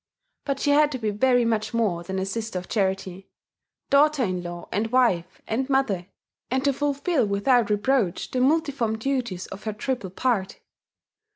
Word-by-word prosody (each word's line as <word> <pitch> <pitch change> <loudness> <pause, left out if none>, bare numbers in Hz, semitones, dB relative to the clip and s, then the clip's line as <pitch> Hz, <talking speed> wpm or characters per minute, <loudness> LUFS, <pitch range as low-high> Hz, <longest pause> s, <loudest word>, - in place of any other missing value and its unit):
But 275 -1 -1
she 290 - +2
had 295 +1 +4
to - - -2
be 220 -3 -1
very 245 +3 +3
much 225 0 -1
more 205 -7 +1
than 190 +2 -5
a 190 - -1
Sister 220 0 -4
of 180 - -6
Charity, 190 -2 -2 0.6
daughter 290 0 +4
in 185 -4 -1
law 175 0 -7
and 210 +3 0
wife 230 -9 +1
and 260 +5 -2
mother, 215 -10 +1 0.4
and 260 +1 0
to 280 0 +3
fulfil 285 - 0
without 215 +3 +2
reproach 210 -2 0
the 255 - 0
multiform 270 -6 +1
duties 235 -7 -2
of 200 - -10
her 215 - -2
triple 225 -1 -3
part. 195 -1 -1
230 Hz, 170 wpm, -25 LUFS, 195-265 Hz, 0.6 s, had